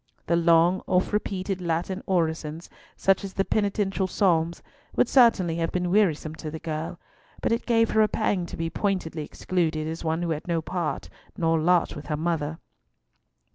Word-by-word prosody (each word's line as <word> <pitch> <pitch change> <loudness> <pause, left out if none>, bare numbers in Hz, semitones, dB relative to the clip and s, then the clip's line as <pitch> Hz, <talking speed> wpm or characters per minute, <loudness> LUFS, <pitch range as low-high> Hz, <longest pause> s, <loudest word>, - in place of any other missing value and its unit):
The 170 - +2
long 170 +2 +4
oft 185 +3 +1
repeated 195 -2 -2
Latin 175 +3 -2
orisons, 160 -2 -1 0.3
such 195 0 +2
as 195 -1 -6
the 195 - 0
penitential 200 -2 0
Psalms, 170 -3 +1 0.3
would - - +3
certainly 205 -11 +4
have 165 -1 -1
been 180 -1 -1
wearisome 170 -6 +2
to 155 - -6
the 160 - -5
girl, 160 +2 -5 0.4
but - - -1
it 230 - -1
gave 230 -2 +3
her 220 - +4
a 215 - +5
pang 200 -5 0
to - - -8
be 165 - -1
pointedly 185 -6 -2
excluded 160 -1 -1
as 165 +1 -5
one 165 +1 -1
who 170 - -1
had 155 +1 -4
no 170 -1 +1
part 170 0 -3 0.3
nor 165 -1 +2
lot 175 +2 +2
with 150 - -9
her 150 - -1
mother. 160 -1 -1
170 Hz, 175 wpm, -26 LUFS, 160-195 Hz, 0.4 s, a